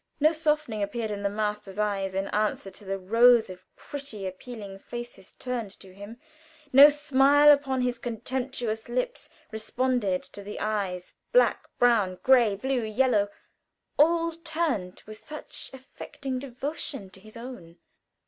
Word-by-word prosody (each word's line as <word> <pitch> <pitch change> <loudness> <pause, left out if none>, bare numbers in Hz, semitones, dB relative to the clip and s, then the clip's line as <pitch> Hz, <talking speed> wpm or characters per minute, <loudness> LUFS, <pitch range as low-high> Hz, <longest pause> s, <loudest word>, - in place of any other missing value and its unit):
No 305 +2 +5
softening 305 -8 0
appeared 220 +2 -2
in 205 -1 -4
the 200 - 0
master's 210 -1 -3
eyes 200 -2 -1
in 195 +1 -1
answer 210 -2 -1
to 200 - -11
the 195 0 -3
rows 230 +3 +5
of 185 - -13
pretty 275 -9 -7
appealing 195 +1 -8
faces 240 -4 -8
turned 245 -4 -4
to 190 -1 -14
him; 205 +4 -10 0.6
no 280 +3 +10
smile 290 0 +5
upon 275 -3 +2
his 245 -1 -1
contemptuous 240 -1 -4
lips 255 - -3 0.2
responded 220 -3 -1
to 200 - -11
the 205 +1 -7
eyes 195 -4 -2 0.2
black, - - +3
brown, 215 -7 +3
gray, 245 -6 +5
blue, 260 +4 -1
yellow 220 -2 +2 0.7
all 335 +2 +4
turned 315 - -3
with 215 0 -12
such 305 0 -8
affecting 265 0 -7
devotion 275 -4 -5
to 190 - -11
his 215 +3 -12
own. 230 -9 -10
235 Hz, 140 wpm, -27 LUFS, 200-265 Hz, 0.7 s, no